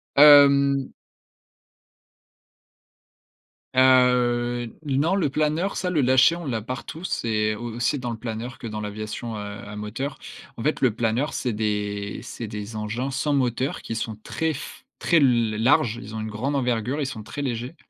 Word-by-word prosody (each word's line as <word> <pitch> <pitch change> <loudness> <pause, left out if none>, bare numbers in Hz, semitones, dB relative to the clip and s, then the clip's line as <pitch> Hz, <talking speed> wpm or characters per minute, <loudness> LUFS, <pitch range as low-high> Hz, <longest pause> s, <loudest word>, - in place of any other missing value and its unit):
Hem 140 -2 +7 2.8
Heu, 125 -2 +4 0.2
n 135 -1 +1
non 170 +5 +2
le 170 -7 +1
planeur, 155 +6 0
ça, 180 - -1
le 160 -5 +1
lâcher, 130 +5 +5
on 170 -2 -7
l'a 115 -5 -2
partout, 130 - -7
c'est 110 - 0
au 120 +1 -6
aussi 120 +4 0
dans 120 -1 -4
le 115 - -5
planeur 120 +3 -6
que 115 - -6
dans 105 0 -5
l'aviation, 110 +2 -5
heu, - - -5
à 105 0 -7
moteur. 105 +7 -5 0.4
En 115 - -5
fait, 150 - 0
le 120 -5 +3
planeur, 120 +6 0
c'est 120 -3 -2
des 105 -1 -2
c'est 115 -1 -7
des 105 +1 -7
engins 110 +5 -3
sans 140 +2 0
moteur 130 0 0
qui 115 - -5
sont 110 -1 -3
très 160 -1 -1
f 155 - -9
très 170 - +3
l 120 -6 +3
larges. 120 -2 +3
Ils 110 0 -9
ont 110 - -3
une 110 - -4
grande 125 +7 -2
envergure, 125 +2 0
ils 140 - 0
sont 110 -5 -6
très 145 +6 -6
légers 125 +2 -3
120 Hz, 170 wpm, -24 LUFS, 110-140 Hz, 2.8 s, Hem